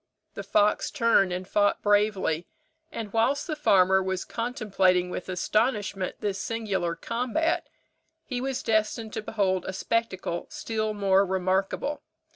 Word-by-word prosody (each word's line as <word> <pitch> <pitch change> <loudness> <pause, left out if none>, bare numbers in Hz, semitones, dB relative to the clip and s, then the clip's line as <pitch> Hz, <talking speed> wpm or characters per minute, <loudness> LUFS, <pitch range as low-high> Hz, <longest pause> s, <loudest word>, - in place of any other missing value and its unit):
The - - -5
fox 210 0 +2
turned 230 -8 +3
and 180 +1 -4
fought 205 0 +2
bravely; 205 -5 +2 0.4
and 215 -3 -6
whilst 265 +6 +2
the 310 - -3
farmer 190 -9 +4
was 190 -1 -2
contemplating 195 -7 +1
with 180 - -5
astonishment 205 +1 0
this 200 -2 -2
singular 200 -7 -2
combat, 250 - -1 0.6
he 250 -2 -3
was 265 -1 -2
destined 220 0 0
to 220 - -3
behold 195 -4 0
a 190 - -3
spectacle 190 -5 -2
still 215 -1 -3
more 195 -1 +3
remarkable. 190 +9 -1
205 Hz, 130 wpm, -27 LUFS, 190-230 Hz, 0.6 s, farmer